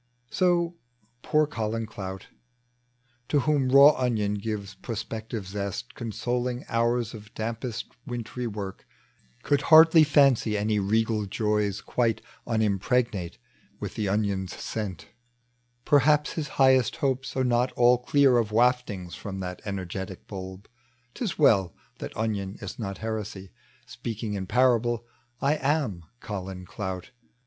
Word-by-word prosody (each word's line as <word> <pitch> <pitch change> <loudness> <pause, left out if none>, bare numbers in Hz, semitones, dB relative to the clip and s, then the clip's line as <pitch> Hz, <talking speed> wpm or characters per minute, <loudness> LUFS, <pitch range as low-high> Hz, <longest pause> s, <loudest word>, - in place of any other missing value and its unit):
So 175 -2 +1 0.4
poor 155 +3 +2
Colin 115 -5 -3
Clout, 95 -3 -7 1.0
To 145 - +2
whom 140 -1 +1
raw 140 +3 +9
onion 115 -7 0
gives 105 -1 -4
prospective 110 +1 -5
zest, 100 -9 -5
Consoling 120 +2 -3
hom^ 115 0 0
of 105 -1 -11
dampest 115 +1 -4 0.2
wintry 120 0 -4
work, 100 -3 -6 0.6
Could 145 - +2
hardly 160 0 +8
fancy 135 -7 +4
any 105 +1 +1
regal 110 +1 +1
joys 105 -1 0
Quite 115 -3 0 0.2
unimpregnate 110 -3 0 0.4
with - - -5
the 105 -3 -2
onion's 100 -2 -1
scent: 100 -6 -5 0.8
Perhaps 150 +1 +4
his 155 -3 -3
highest 130 -2 +4
hopes 135 -1 -2
are 130 - +2
not 125 0 +2
all 120 0 +5
clear 130 0 +4
Of 110 -3 0
waftinga 110 -6 +1
from 95 -2 -6
that 90 -1 -6
enei^etic 95 -1 -5
tnlb: 95 0 -8 0.5
'Tis 215 -9 -3
well 95 - +4 0.2
that - - -7
onion 105 -3 -2
is 100 0 -7
not 100 -3 -4
heresy. 105 -4 -5 0.3
Speaking 115 -3 -5
in 95 -2 -4
parable, 120 -1 +2 0.4
I 145 +3 +2
am 135 - -1 0.2
Colin 95 -3 -6
Clout. 95 +5 -5
110 Hz, 125 wpm, -27 LUFS, 100-125 Hz, 1.0 s, raw